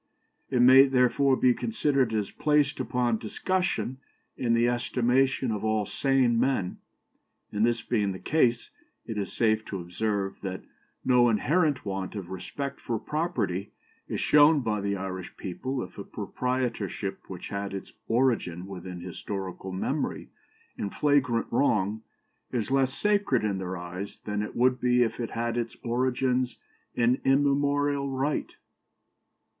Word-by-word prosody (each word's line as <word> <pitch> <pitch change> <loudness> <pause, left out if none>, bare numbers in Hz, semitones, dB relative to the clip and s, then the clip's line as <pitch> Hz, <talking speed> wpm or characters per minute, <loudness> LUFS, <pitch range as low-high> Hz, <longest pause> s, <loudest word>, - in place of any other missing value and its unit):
It 125 -2 +3
may, 130 +2 +8
therefore, 130 +1 +3
be 125 -1 +4
considered 140 - +1
as 105 -2 -1
placed 150 -2 +2
upon 125 -3 0
discussion 175 - -1 0.4
in 115 -2 +1
the 120 +1 +3
estimation 125 +1 +1
of 105 -1 -3
all 110 -1 +1
sane 130 -1 +2
men; 125 -8 0 0.7
and, 105 +1 0
this 115 0 +1
being 105 -5 0
the 95 - -5
case, 120 -2 +1 0.3
it 110 -2 -4
is 100 - -3
safe 110 -1 +2
to 100 - -5
observe 95 +3 -2
that 95 -2 -5 0.4
no 125 -1 +5
inherent 145 - +1
want 95 0 -4
of 95 -3 -6
respect 140 +9 -5
for 115 - -2
property 110 - -2 0.3
is - - -3
shown 150 0 +5
by 105 -4 -1
the 100 0 -1
Irish 95 -1 -6
people 130 +8 -4
if 90 - -11
a - - -4
proprietorship 125 -6 -3
which 90 -2 -7
had 100 0 -3
its 95 -1 -7
origin 115 -8 +1
within 90 -2 -7
historical 95 +1 -6
memory 95 - -2 0.5
in 100 - -2
flagrant 135 -3 +2
wrong 110 -4 +1 0.5
is 120 0 -2
less 135 -1 +3
sacred 200 - +1
in 100 -3 0
their 95 0 -4
eyes 90 +3 -6
than 105 0 -1
it 105 - -5
would 125 +1 +3
be 125 0 +4
if 115 0 -3
it 115 - -2
had 115 0 -2
its 115 -1 -3
origin 125 +1 +1 0.5
in 120 +2 +2
immemorial 140 +1 +2
right." 135 +3 -2
120 Hz, 145 wpm, -27 LUFS, 100-135 Hz, 0.7 s, may